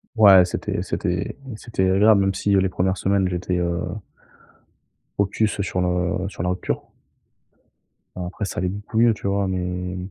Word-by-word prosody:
Ouais, 100 -5 +8
c'était 90 - -3
c'était - - -3 0.2
c'était 105 -5 -1
agréable, 100 +2 +5
même 95 0 +1
si, 100 +1 0
heu, - - +5
les 95 - +2
1res 95 +1 0
semaines 95 0 +1
j'étais, 90 0 -2
heu 85 -1 -1 1.4
focus, 100 +1 0
sur 95 -2 -2
le 90 +1 0
sur 90 - -6
la 90 - 0
rupture. 90 - -2 1.3
Bon, 90 - -4
après 95 +4 -4
ça - - -6
allait 90 +1 0
beaucoup 105 +4 -6
mieux, 115 -1 +5
tu 105 - -5
vois? 100 0 0
Mais 90 -1 -3
95 Hz, 165 wpm, -22 LUFS, 90-100 Hz, 1.4 s, Ouais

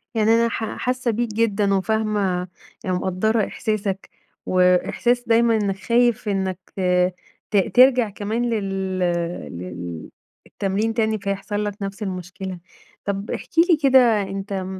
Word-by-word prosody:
يعني 220 0 +3
أنا 230 0 +3
حا 220 -1 -4
حاسّة 250 -1 -1
بيك 235 +2 -1
جدًا 210 -2 +1
وفاهمة، 200 -3 0 0.4
ومقدرة 190 +4 0
إحساسك 200 -3 -3 0.4
وإحساس 185 +7 +2
دايمًا 230 0 +4
إنّك 200 -2 0
خايف 235 +3 +1
إنّك 190 -2 -1 0.9
ت 210 - +3 0.2
ترجع 250 -3 +6
كمان 220 +4 -2
لل 195 -4 -2 0.6
لل 85 -2 -7 0.4
التمرين 205 +3 -1
تاني، 220 -1 0
فيحصل 200 +1 -3
لك 205 0 -5
نفس 195 +2 -4
المشكلة، 185 -1 -5 0.5
طب 200 +1 -3
احكِ - - -5 0.2
لي 335 - +6
كده 250 -5 +5
أنت 195 0 -4
205 Hz, 120 wpm, -22 LUFS, 190-230 Hz, 0.9 s, ترجع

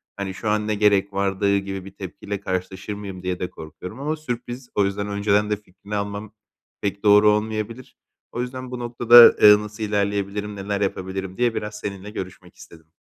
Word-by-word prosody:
hani, 100 -1 -4
"Şu 105 +3 -3
an 105 0 0
ne 105 - 0
gerek 100 -1 +3
vardı?" 100 0 +1
gibi 95 -1 -5
bir 100 - -9
tepkiyle 100 +1 -6
karşılaşır 95 +1 -4
mıyım 100 -3 -8
diye 90 -1 -2
de 90 - -3
korkuyorum 80 - -10
ama 150 +3 -1
sürpriz. 125 -3 -6
O 100 - +3
yüzden 100 +1 -2
önceden 105 +1 +1
de 105 - +2
fikrini 100 +1 -9
almam 100 +1 -4 0.5
pek 100 0 -3
doğru 105 0 +6
olmayabilir. 110 +3 -3 0.3
O 120 - -3
yüzden 130 0 -6
bu 125 - -5
noktada, 120 0 +2 0.3
ııı, 105 0 +9
nasıl 105 +1 -7
ilerleyebilirim, 100 0 -1
neler 100 0 -3
yapabilirim 95 -1 -3
diye 120 -2 +1
biraz 105 0 -4
seninle 100 -1 -6
görüşmek 95 -3 -8
istedim. 80 -1 -16
100 Hz, 180 wpm, -23 LUFS, 95-105 Hz, 0.5 s, ııı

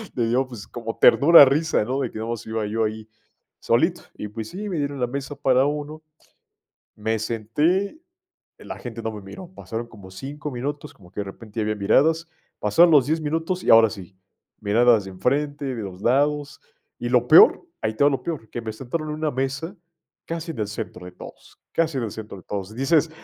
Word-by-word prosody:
Le 120 -2 +1
dio, 130 +2 +1
pues, 120 -5 -10
como 115 -2 -6
ternura, 150 0 +8
risa, 145 -3 +1
¿no?, 130 +4 -2
de 125 - -1
que - - -8
nada 115 +1 -3
mas 115 - -5
iba 110 -1 -2
yo 115 +2 -1
ahí, 110 0 -5 0.5
solito. - - +1 0.2
Y 105 - -5
pues 110 0 -6
sí, 210 +3 -6
me 180 - -3
dieron 140 -1 -2
la 125 - +2
mesa 140 +3 -5
para 130 0 +3
1, 150 +1 -4 1.0
me 110 +1 -1
senté, 145 - 0 0.6
la - - -8
gente 115 -2 -7
no 110 - -2
me 105 - -8
miró. 170 - -10
Pasaron 115 -6 -6
como 100 -5 -13
5 145 +8 -6
minutos, 145 +4 -5
como 90 -3 -18
que 95 - -12
de - - -2
repente 105 +3 -10
ya - - +1
había 105 0 -1
miradas. 160 +11 +2 0.3
Pasaron 165 +12 +5
los 140 -3 +6
10 160 +2 0
minutos 165 +4 -2
y - - +2
ahora 115 -1 +7
sí, 95 -3 -10 0.4
miradas 110 0 +4
de - - -7
enfrente, 140 +7 -1
de 115 - -5
los 95 -1 -8
lados, 145 +4 +1 0.4
y - - -2
lo - - +3
peor, 430 - +7 0.2
ahí 110 0 -1
te 140 - +2
va 145 - +5
lo 135 - -2
peor, 150 -10 -5
que 120 - -4
me 110 - -4
sentaron 135 +8 -5
en 150 - -3
una 155 0 -1
mesa 135 +7 -3 0.5
casi 165 0 -4
en 120 - -7
el 105 - -1
centro 105 -3 -6
de - - -8
todos, - - -13
casi 160 -4 0
en 120 - -1
el 105 - -5
centro 110 -2 -8
de 90 - -15
todos. 100 0 -5
Dices: 150 +5 +2
125 Hz, 210 wpm, -23 LUFS, 110-150 Hz, 1.0 s, ternura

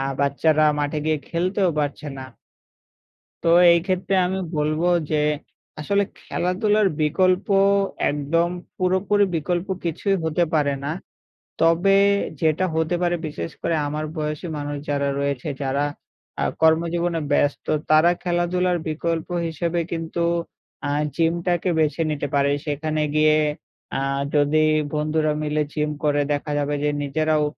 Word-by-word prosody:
আ - - -1 0.2
বাচ্চারা 150 +2 +2 0.2
মাঠে 145 +1 -1
গিয়ে 155 -1 +1
খেলতেও 185 +2 +1
পারছে 150 +1 -2
না। 130 - -7 1.2
তো 165 - +2 0.2
এই 170 - +5
ক্ষেত্রে 185 0 0
আমি 190 +1 -2 0.2
বলব 155 +1 0 0.3
যে, - - +2 0.6
আসলে 200 +7 +1 0.2
খেলাধুলার 205 +4 +1
বিকল্প 185 +5 +2 0.6
একদম 150 +4 0 0.3
পুরোপুরি 190 +3 +2
বিকল্প 175 +3 -1 0.2
কিছুই 195 +4 0
হতে 160 +2 +1
পারে 145 -3 +2
না। 145 - -2 0.7
তবে 170 +4 +4 0.5
যেটা 160 +3 +2
হতে 160 +2 +1
পারে, 175 0 +1
বিশেষ 85 - -5
করে 165 - 0
আমার 150 +1 -3
বয়সী 150 +2 -3
মানুষ 145 0 -4
যারা 140 -1 0
রয়েছে 140 0 -2
যারা 135 +1 0 0.6
আ - - +2 0.2
কর্মজীবনে 165 +1 +2
ব্যস্ত 145 0 +1 0.2
তারা 155 +3 +6
খেলাধুলার 180 0 +1
বিকল্প 165 +1 -2 0.2
হিসেবে 170 +2 -2
কিন্তু 165 0 -3 0.7
আ - - -1 0.3
জিমটাকে 170 +2 0
বেছে 155 +1 +1
নিতে 145 -1 -2
পারে 140 0 +3
সেখানে 155 +1 -2
গিয়ে 155 0 +4 0.6
আ - - 0 0.4
যদি 145 +1 +3 0.3
বন্ধুরা 155 0 +1
মিলে 150 0 0
জিম 150 -1 -1
করে 145 -1 +2
দেখা 145 +1 -3
যাবে 145 0 -1
যে, 150 - +2
নিজেরাও 155 +2 +1
155 Hz, 130 wpm, -23 LUFS, 150-175 Hz, 1.2 s, তারা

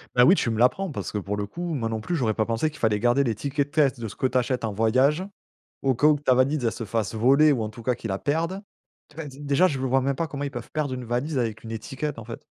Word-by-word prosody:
Bah, 125 - +7
oui, 185 - +7
tu 115 - 0
me 110 - -2
l'apprends, 175 +9 +2
parce 100 - -5
que, - - -3
pour 100 +1 -3
le 100 - -3
coup, 170 - -4
moi 115 -6 -1
non 110 -1 -2
plus 170 +11 -3
j'aurais 110 -7 0
pas 110 - +1
pensé 115 +7 0
qu'il 155 - -13
fallait 105 -2 +2
garder 120 +4 +3
les 115 -4 0
tickets 140 +5 -2
de 145 - -28
caisse 140 -4 +3
de 115 - -4
ce 105 - -9
que 130 - +1
tu 130 - 0
achètes 125 0 0
en 110 - -1
voyage. 130 - +2 0.6
Au 135 -2 +2
cas 145 - +1
où, 150 -1 +4
ta 130 -3 +3
valise 135 +2 +2
elle 115 - +2
se 115 - -6
fasse 110 0 -2
voler 140 +7 +5
ou 125 -6 0
en 105 - -3
tout 115 +2 -11
cas 125 0 +1
qu'ils 115 - -6
la 95 - -2
perdent. 165 +6 -1 0.5
Tout 155 - -21
cas 160 - -5
déjà, 140 +5 +1
je 140 -6 -3
vois 130 0 +2
même 135 +1 0
pas 165 +2 -2
comment 145 -1 -5
ils 140 - -3
peuvent 120 -3 -7
perdre 150 -4 -2
une 125 -1 -5
valise 130 +5 -2
avec 115 -3 -2
une 115 - -7
étiquette, 135 +4 -4
en 115 - -9
fait? 115 - -8
130 Hz, 305 wpm, -25 LUFS, 115-145 Hz, 0.6 s, Bah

